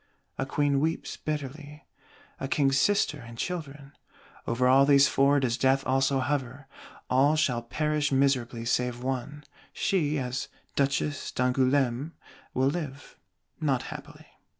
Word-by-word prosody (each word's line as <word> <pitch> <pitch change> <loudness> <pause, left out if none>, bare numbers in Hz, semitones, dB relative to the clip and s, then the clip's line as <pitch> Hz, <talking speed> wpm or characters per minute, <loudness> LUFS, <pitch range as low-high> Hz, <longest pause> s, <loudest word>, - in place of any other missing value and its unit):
A 135 - -1
Queen 145 0 +1
weeps 160 +3 -2
bitterly; 150 0 -6 0.5
a 135 - -3
King's 135 -1 +2
Sister 200 -5 +2
and 115 -2 -11
Children. 145 -4 -5 0.6
Over 125 +2 +1
all 135 +2 +6
these 140 0 +6
Four 140 +1 +3
does 125 -2 -1
Death 135 0 +2
also 135 +1 +2
hover: 135 -1 -2 0.4
all 140 +4 +3
shall 135 -6 +1
perish 150 +4 -1
miserably 130 -4 +1
save 125 +1 -1
one; 135 +3 -4 0.3
she, 155 -6 0
as 130 0 -3 0.3
Duchesse 140 +1 0
d'Angoulême, 130 +2 +1 0.4
will 130 +1 +3
live, 145 -3 -6 0.4
not 140 -5 0
happily. - - -11
135 Hz, 125 wpm, -27 LUFS, 130-145 Hz, 0.6 s, all